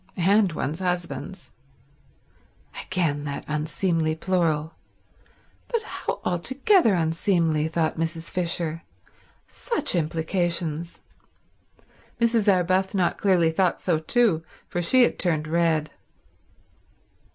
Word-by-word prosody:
"And 195 Hz, +2 st, +3 dB
one's 155 Hz, +2 st, -3 dB
husbands." 180 Hz, +1 st, -4 dB, 1.3 s
Again 150 Hz, -5 st, -1 dB
that 140 Hz, -1 st, -5 dB
unseemly 155 Hz, +1 st, -1 dB
plural. 160 Hz, -3 st, 0 dB, 0.9 s
But 465 Hz, -2 st, -2 dB
how -, -, -4 dB
altogether 260 Hz, -, +3 dB
unseemly, 165 Hz, -1 st, +1 dB
thought 160 Hz, 0 st, -1 dB
Mrs. 165 Hz, 0 st, -3 dB
Fisher. 165 Hz, -2 st, -1 dB, 0.7 s
Such 470 Hz, -2 st, -2 dB
implications. 170 Hz, 0 st, -1 dB, 1.2 s
Mrs. 230 Hz, -3 st, +3 dB
Arbuthnot 185 Hz, 0 st, +1 dB
clearly 180 Hz, -5 st, +3 dB
thought 180 Hz, +2 st, +1 dB
so 170 Hz, -4 st, 0 dB
too, 185 Hz, 0 st, +2 dB, 0.3 s
for 175 Hz, -, -3 dB
she 250 Hz, +9 st, +5 dB
had -, -, 0 dB
turned 155 Hz, -4 st, 0 dB
red. 160 Hz, -2 st, +1 dB
170 Hz, 95 wpm, -24 LUFS, 160-190 Hz, 1.3 s, she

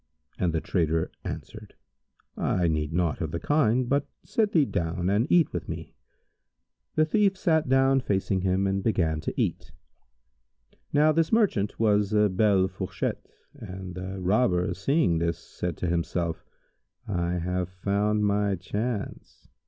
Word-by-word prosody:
and 90 Hz, -2 st, +1 dB
the 80 Hz, -, 0 dB
trader 80 Hz, -2 st, 0 dB
answered, -, -, -8 dB, 0.6 s
"I 90 Hz, -2 st, +1 dB
need 75 Hz, -1 st, -1 dB
naught 85 Hz, -1 st, 0 dB
of 80 Hz, -, -1 dB
the 85 Hz, -, -3 dB
kind, 130 Hz, -, +2 dB
but 140 Hz, +2 st, +1 dB, 0.2 s
sit 215 Hz, -2 st, +1 dB
thee 155 Hz, -4 st, +4 dB
down 90 Hz, -2 st, -1 dB
and 110 Hz, +7 st, +1 dB
eat 175 Hz, -3 st, +4 dB
with -, -, -4 dB
me." -, -, -6 dB, 1.0 s
The 155 Hz, -, +4 dB
thief 195 Hz, +3 st, +2 dB
sat 160 Hz, -7 st, +1 dB
down 135 Hz, 0 st, +4 dB
facing 95 Hz, -3 st, 0 dB
him 95 Hz, +1 st, +1 dB
and 95 Hz, 0 st, 0 dB
began 85 Hz, -8 st, +1 dB
to -, -, -3 dB
eat. -, -, -2 dB, 1.2 s
Now 150 Hz, +2 st, +4 dB
this 160 Hz, +1 st, +1 dB
merchant 195 Hz, -, +1 dB
was 105 Hz, -2 st, +2 dB
a 105 Hz, -1 st, +4 dB
belle 95 Hz, -1 st, +3 dB
fourchette, 95 Hz, -2 st, -4 dB, 0.2 s
and 95 Hz, 0 st, -8 dB
the 95 Hz, +1 st, -6 dB
Robber 90 Hz, -2 st, +2 dB
seeing 100 Hz, -, +1 dB
this, 85 Hz, 0 st, 0 dB
said 90 Hz, -3 st, -5 dB
to 90 Hz, -, -2 dB
himself, 85 Hz, -1 st, -1 dB, 0.6 s
"I 85 Hz, -3 st, -1 dB
have 90 Hz, +1 st, -2 dB
found 100 Hz, +3 st, 0 dB
my 100 Hz, -1 st, +1 dB
chance." 105 Hz, +5 st, -5 dB
95 Hz, 145 wpm, -27 LUFS, 90-125 Hz, 1.2 s, thee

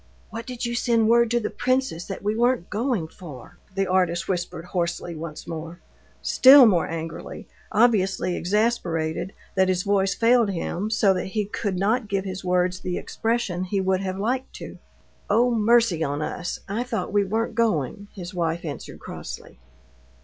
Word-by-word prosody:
"What 230 Hz, +1 st, -6 dB
did 250 Hz, -1 st, -4 dB
you 235 Hz, -, -2 dB
send 235 Hz, -2 st, +2 dB
word 235 Hz, 0 st, +5 dB
to 240 Hz, +1 st, +2 dB
the 215 Hz, -, -3 dB
princess 255 Hz, -10 st, -1 dB
that 195 Hz, -, -7 dB
we 210 Hz, +1 st, 0 dB
weren't 240 Hz, -5 st, +1 dB
going 220 Hz, -6 st, -1 dB
for?" 150 Hz, -8 st, -12 dB, 0.2 s
the 195 Hz, 0 st, +1 dB
artist 180 Hz, -2 st, +1 dB
whispered 175 Hz, -2 st, -3 dB
hoarsely 175 Hz, -1 st, -2 dB
once 160 Hz, -1 st, -7 dB
more, 165 Hz, +1 st, -6 dB, 0.4 s
still 265 Hz, 0 st, +8 dB
more 185 Hz, -7 st, +3 dB
angrily, 165 Hz, 0 st, -6 dB, 0.2 s
obviously 195 Hz, -5 st, +2 dB
exasperated 180 Hz, -5 st, 0 dB, 0.2 s
that 190 Hz, -1 st, +3 dB
his 185 Hz, 0 st, +1 dB
voice 195 Hz, -1 st, +1 dB
failed 235 Hz, -1 st, +4 dB
him 190 Hz, +2 st, -3 dB
so 215 Hz, -3 st, +3 dB
that 185 Hz, -, -3 dB
he 210 Hz, -, +1 dB
could 200 Hz, -1 st, -3 dB
not 215 Hz, +4 st, +1 dB
give 195 Hz, -1 st, -1 dB
his 190 Hz, 0 st, -5 dB
words 180 Hz, 0 st, +1 dB
the 180 Hz, -1 st, -3 dB
expression 225 Hz, -6 st, -2 dB
he 195 Hz, +2 st, -1 dB
would 190 Hz, 0 st, +1 dB
have 190 Hz, -1 st, -3 dB
liked 255 Hz, +6 st, -2 dB
to. -, -, -9 dB, 0.5 s
"Oh, 235 Hz, +4 st, +3 dB
mercy 225 Hz, -6 st, +3 dB
on 145 Hz, 0 st, -2 dB
us! 175 Hz, +3 st, -4 dB
I 205 Hz, +4 st, -2 dB
thought 245 Hz, -4 st, -3 dB
we 205 Hz, -1 st, +4 dB
weren't 220 Hz, +4 st, -1 dB
going," 205 Hz, -, 0 dB
his 180 Hz, -2 st, -7 dB
wife 170 Hz, 0 st, -2 dB
answered 145 Hz, -3 st, -7 dB
crossly. -, -, -9 dB
195 Hz, 170 wpm, -24 LUFS, 175-230 Hz, 0.5 s, still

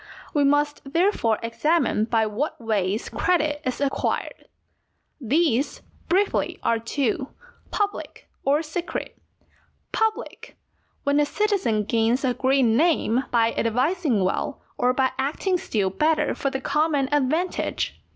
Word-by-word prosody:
We 290 Hz, -, +3 dB
must 290 Hz, +1 st, +2 dB
therefore 330 Hz, -, +2 dB
examine 230 Hz, -1 st, +1 dB
by 225 Hz, -1 st, +2 dB
what 215 Hz, +8 st, -3 dB
ways 215 Hz, -3 st, -1 dB
credit 300 Hz, -4 st, 0 dB
is 255 Hz, -3 st, -2 dB
acquired. 280 Hz, -1 st, -2 dB, 0.7 s
These, 280 Hz, 0 st, +1 dB, 0.3 s
briefly, 390 Hz, +3 st, +1 dB
are 230 Hz, -, +2 dB
two, 270 Hz, -, -1 dB, 0.4 s
public 410 Hz, -1 st, -3 dB, 0.2 s
or 290 Hz, +4 st, +2 dB
secret. 340 Hz, +3 st, -5 dB, 0.8 s
Public, 445 Hz, 0 st, -2 dB, 0.5 s
when 285 Hz, +1 st, +2 dB
a 295 Hz, -, +4 dB
citizen 390 Hz, -, +1 dB
gains 230 Hz, +5 st, +1 dB
a 250 Hz, -, +2 dB
great 265 Hz, +2 st, +2 dB
name 255 Hz, 0 st, +2 dB
by 230 Hz, -1 st, +2 dB
advising 255 Hz, -, +1 dB
well 230 Hz, +9 st, -2 dB
or 250 Hz, 0 st, +2 dB
by 260 Hz, +1 st, +1 dB
acting 340 Hz, +7 st, 0 dB
still 200 Hz, -, -1 dB
better 310 Hz, +9 st, +1 dB
for 275 Hz, -, -1 dB
the 265 Hz, 0 st, -4 dB
common 295 Hz, -1 st, +1 dB
advantage. 300 Hz, +6 st, -1 dB
275 Hz, 120 wpm, -24 LUFS, 230-320 Hz, 0.8 s, a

